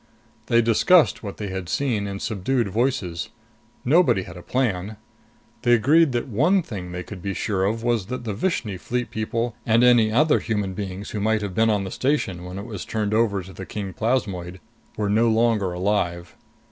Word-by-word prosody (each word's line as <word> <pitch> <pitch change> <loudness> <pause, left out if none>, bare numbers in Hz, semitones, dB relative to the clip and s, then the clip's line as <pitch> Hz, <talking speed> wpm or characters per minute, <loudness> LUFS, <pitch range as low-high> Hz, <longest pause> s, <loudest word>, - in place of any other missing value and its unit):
They 115 0 +4
discussed 150 - +4
what 100 -3 -7
they 105 -2 -4
had 95 -2 -5
seen 115 -8 0
in 100 0 -5
subdued 110 +3 -1
voices. 105 - -1 0.6
Nobody 145 - +4
had 85 - -11
a 90 - -9
plan. 105 -3 -1 0.6
They 120 - +3
agreed 145 +7 +4
that 120 +2 -1
one 155 - +2
thing 95 - -7
they 90 +1 -5
could 100 -2 -9
be 100 +1 -3
sure 95 -3 0
of 115 +3 -1
was 115 -5 0
that 125 +1 -5
the 110 -3 -3
Vishni 110 - -2
Fleet 125 +5 -3
people 115 +1 -2
and 115 +1 +3
any 120 -3 +5
other 150 +7 +4
human 105 -4 -2
beings 95 0 -6
who 105 - -3
might 110 +1 +1
have 100 -2 -4
been 110 +4 +3
on 105 -2 +1
the 95 - -6
station 100 -11 -1
when 90 +1 -7
it 100 - -6
was 105 -7 -6
turned 105 -1 -2
over 105 -4 +1
to 95 +2 -12
the 95 - -8
king 100 -3 -5
plasmoid 95 -7 -2 0.4
were 105 - 0
no 110 +3 +3
longer 110 -4 +2
alive. 90 -2 -1
105 Hz, 195 wpm, -23 LUFS, 95-120 Hz, 0.6 s, any